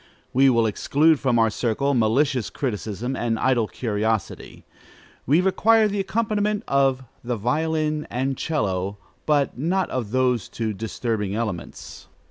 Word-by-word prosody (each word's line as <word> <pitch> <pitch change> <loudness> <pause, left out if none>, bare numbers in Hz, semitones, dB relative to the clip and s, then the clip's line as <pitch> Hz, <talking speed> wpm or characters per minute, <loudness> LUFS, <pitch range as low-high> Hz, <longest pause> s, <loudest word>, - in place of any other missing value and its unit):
We 135 +2 +5
will 115 -3 +3
exclude 145 +8 +2
from 130 -3 +1
our 115 -1 +3
circle 125 +6 0
malicious 125 +1 +1
criticism 120 0 -3
and 115 -2 -1
idle 120 -2 +1
curiosity: 110 0 -3 0.6
we 150 +7 +4
require 215 +4 +4
the 205 0 -2
accompaniment 210 0 -1
of 135 -1 +2 0.2
the 120 -1 -2
violin 155 +5 -1
and 130 +2 -1
'cello, 100 - -2 0.3
but 145 -4 +1
not 180 +6 0
of 120 -5 -3
those 125 -2 +1
two 110 -2 -3
disturbing 110 -1 -3
elements. 105 - -5
130 Hz, 130 wpm, -23 LUFS, 110-150 Hz, 0.6 s, We